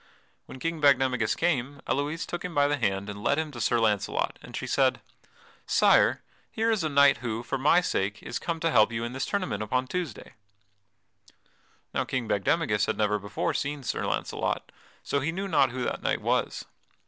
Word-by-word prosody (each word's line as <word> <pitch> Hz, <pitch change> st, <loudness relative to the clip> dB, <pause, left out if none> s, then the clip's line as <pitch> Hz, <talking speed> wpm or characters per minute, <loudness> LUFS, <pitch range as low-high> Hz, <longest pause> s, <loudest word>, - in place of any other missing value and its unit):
When -, -, -9 dB
King 165 Hz, +3 st, -3 dB
Bagdemagus 130 Hz, -5 st, +3 dB
came, 140 Hz, -4 st, 0 dB
Elouise 145 Hz, +4 st, -1 dB
took 175 Hz, -, -5 dB
him 180 Hz, -2 st, -5 dB
by 145 Hz, 0 st, +4 dB
the 145 Hz, 0 st, 0 dB
hand 100 Hz, -5 st, -1 dB
and 100 Hz, 0 st, -7 dB
led 140 Hz, -, +2 dB
him 160 Hz, -1 st, -2 dB
to 120 Hz, -4 st, -7 dB
Sir 120 Hz, +1 st, +2 dB
Launcelot, 105 Hz, -3 st, 0 dB
and -, -, -10 dB
she -, -, -4 dB
said: -, -, +2 dB, 0.7 s
"Sire, -, -, +4 dB, 0.3 s
here 225 Hz, +1 st, 0 dB
is 215 Hz, -6 st, 0 dB
a 155 Hz, -, 0 dB
knight 140 Hz, -1 st, +5 dB
who, 115 Hz, -1 st, -4 dB
for 135 Hz, +2 st, -3 dB
my 155 Hz, +6 st, +5 dB
sake, 100 Hz, -, -2 dB
is 120 Hz, -, -4 dB
come 165 Hz, -1 st, -3 dB
to 165 Hz, -, +1 dB
help 110 Hz, -3 st, +5 dB
you 115 Hz, 0 st, -3 dB
in 120 Hz, +1 st, -4 dB
this 130 Hz, -, -3 dB
tournament 185 Hz, -, -2 dB
upon 125 Hz, +5 st, 0 dB
Tuesday." 165 Hz, -3 st, -5 dB, 1.6 s
Now -, -, +1 dB
King 125 Hz, -3 st, -3 dB
Bagdemagus 105 Hz, -, +1 dB
had -, -, -1 dB
never 105 Hz, -1 st, +1 dB
before 100 Hz, 0 st, -2 dB
seen 145 Hz, -1 st, -3 dB
Sir -, -, -2 dB
Launcelot, -, -, -2 dB, 0.3 s
so 140 Hz, -, 0 dB
he 145 Hz, +4 st, -1 dB
knew 195 Hz, +4 st, -3 dB
not 160 Hz, -8 st, +3 dB
who 125 Hz, +1 st, -4 dB
that -, -, -2 dB
knight -, -, 0 dB
was. -, -, -1 dB
130 Hz, 195 wpm, -27 LUFS, 115-155 Hz, 1.6 s, knight